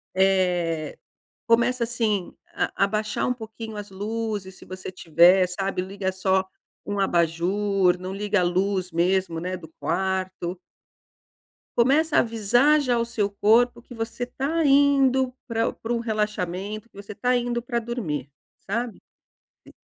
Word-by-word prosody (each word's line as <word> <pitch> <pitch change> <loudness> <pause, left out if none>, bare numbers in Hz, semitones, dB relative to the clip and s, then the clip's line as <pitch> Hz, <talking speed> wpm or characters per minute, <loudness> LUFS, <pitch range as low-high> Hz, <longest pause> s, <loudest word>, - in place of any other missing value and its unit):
Eh, 180 -4 +1 0.5
começa 235 +2 +3
assim, 220 -5 -1 0.2
a 195 - 0
abaixar 210 +1 -1
um 250 - +1
pouquinho 220 -1 -8
as 205 -1 -7
luzes, 205 -1 -4
se - - -14
você 185 0 -7
tiver, 180 +1 +4
sabe, 190 0 -2
liga 190 0 -3
só 190 0 +1 0.4
um 205 0 -2
abajur, 180 +2 +2
não 185 +1 -6
liga 205 0 0
a - - +2
luz 185 0 0
mesmo, 175 0 +1
né, 180 +2 -3
do 160 -3 -11
quarto. 185 0 -2 1.2
Começa 295 +6 +3
a - - +8
avisar 240 +7 +3
já 250 -4 +1
o 230 - +1
seu 225 -4 -1
corpo 230 +4 +3
que 245 - -12
você 230 +2 -4
tá 295 +6 -1
indo 275 -2 +4
pra 230 -1 0
pra 230 +1 -4
um 235 - 0
relaxamento, 210 -1 -3
que - - -30
você 200 +1 -9
tá 250 +3 +1
indo 240 0 -1
pra 235 0 -2
dormir, 215 - -4 0.4
sabe. 235 +2 -2 0.7
E - - -14
205 Hz, 145 wpm, -24 LUFS, 185-235 Hz, 1.2 s, a